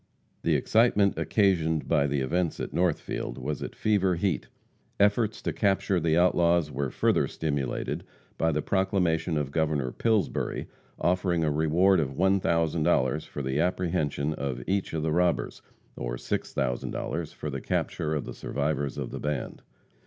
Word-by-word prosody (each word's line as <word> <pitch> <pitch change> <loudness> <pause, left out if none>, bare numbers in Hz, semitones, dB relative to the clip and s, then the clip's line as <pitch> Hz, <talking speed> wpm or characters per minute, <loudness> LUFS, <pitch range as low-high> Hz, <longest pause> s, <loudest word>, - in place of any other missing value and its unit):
The - - +2
excitement 110 -3 +3
occasioned 85 -7 +2
by 75 -3 +3
the 70 -1 0
events 85 +5 -1
at - - -4
Northfield 85 -8 -1
was 70 +3 -4
at - - -6
fever 95 -4 +2
heat. 85 -4 -1 0.5
Efforts 105 +2 +2
to - - -1
capture 100 -2 +1
the 80 0 +2
outlaws 85 -3 +3
were 70 -1 -2
further - - +2
stimulated 70 -5 -2 0.3
by 80 - +1
the 75 -1 -1
proclamation 90 -4 +1
of 70 -2 -2
Governor 75 -5 0
Pillsbury 105 - 0 0.3
offering 90 -1 +1
a 75 - +2
reward 85 +5 +3
of 70 -4 -2
$1,000 80 -6 +2
for 70 - -5
the 65 +2 -1
apprehension 80 -4 0
of 70 -4 -4
each 95 0 -1
of 80 -1 -1
the 80 - 0
robbers, 90 +2 +1 0.3
or - - -3
$6,000 70 +6 -3
for 75 - -5
the 70 -1 -4
capture 80 0 -1
of 75 - -2
the - - -6
survivors 70 -1 -2
of - - -4
the - - -5
band. 75 0 -3
80 Hz, 150 wpm, -27 LUFS, 70-90 Hz, 0.5 s, excitement